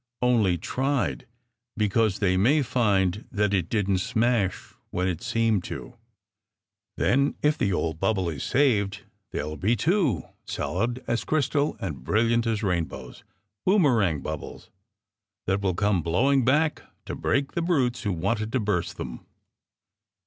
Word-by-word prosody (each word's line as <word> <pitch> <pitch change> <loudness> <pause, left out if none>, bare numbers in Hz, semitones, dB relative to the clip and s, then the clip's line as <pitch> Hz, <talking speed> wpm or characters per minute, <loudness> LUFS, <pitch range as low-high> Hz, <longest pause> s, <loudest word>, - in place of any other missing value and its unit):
Only 110 -8 +3
tried, 135 - -1 0.5
because 105 -1 +2
they 95 -3 +2
may 135 +11 +3
find 100 -5 +1
that 105 -1 +1
it 90 -4 0
didn 100 -3 +1
t - - -1
smash 110 -1 0 0.2
when 90 +1 -1
it 90 -2 -2
seemed 115 -5 +1
to! - - -7 1.0
Then 140 +3 +2
if 150 0 +4
the 100 - 0
old 80 -3 -1
bubble 95 -1 +1
is 75 -6 -4
saved, 110 -8 +1 0.3
there 75 - -3
ll 75 +1 -5
be 105 +9 +2
two, 155 - +1 0.2
solid 120 +8 -2
as 120 0 -1
crystal 150 -1 0
and 75 -9 -5
brilliant 115 - +2
as 110 -1 -1
rainbows 80 -9 -3 0.4
boom 195 0 +4
erang 100 - +2
bubbles 80 -2 -7 0.7
that 95 +2 0
will 95 -3 0
come 105 -2 +1
blowing 130 - +2
back 150 +5 +2 0.2
to - - -5
break 140 0 0
the 170 - -2
brutes 135 -8 +1
who 105 -4 -1
wanted 100 +5 -1
to 130 - +2
burst 105 -6 -1
them!" - - -6
105 Hz, 150 wpm, -26 LUFS, 90-125 Hz, 1.0 s, if